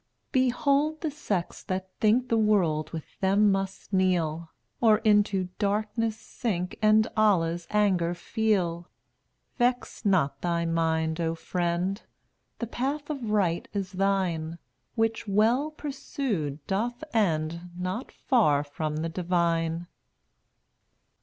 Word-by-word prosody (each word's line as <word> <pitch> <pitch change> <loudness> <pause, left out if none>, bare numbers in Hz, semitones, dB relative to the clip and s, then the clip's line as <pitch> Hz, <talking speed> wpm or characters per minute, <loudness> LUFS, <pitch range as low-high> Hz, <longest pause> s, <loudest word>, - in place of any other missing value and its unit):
214 255 -2 +3
Behold 295 +3 +1
the 315 - -1
sects 200 - -3
that 185 0 -4
think 230 +4 +3
The 230 - +3
world 170 -8 +2
with 160 -2 -8
them 200 +2 +4
must 195 +1 -3
kneel, 170 -4 +1 0.3
Or 220 -3 +6
into 205 -4 +2
Darkness 215 +2 0
sink 185 -7 -3
And 215 +1 +5
Allah's 175 -6 +2
anger 185 -5 +2
feel. 175 -3 0 0.7
Vex 245 +1 0
not 185 -9 +2
thy 170 -1 0
mind, 160 0 0
O 165 0 0
friend; 175 +4 -1 0.6
The 235 - -3
path 280 +6 -3
of 260 -7 -4
right 190 -5 +1
is 195 -2 -3
thine, 185 -4 0 0.4
Which, 225 -1 0
well 225 +9 +3
pursued, 250 - -4
doth 235 - -2
end 170 -4 0
Not 185 +7 -4
far 150 - +2
from 150 +1 -4
the - - -2
Divine. 170 -1 0
195 Hz, 120 wpm, -27 LUFS, 170-220 Hz, 0.7 s, Or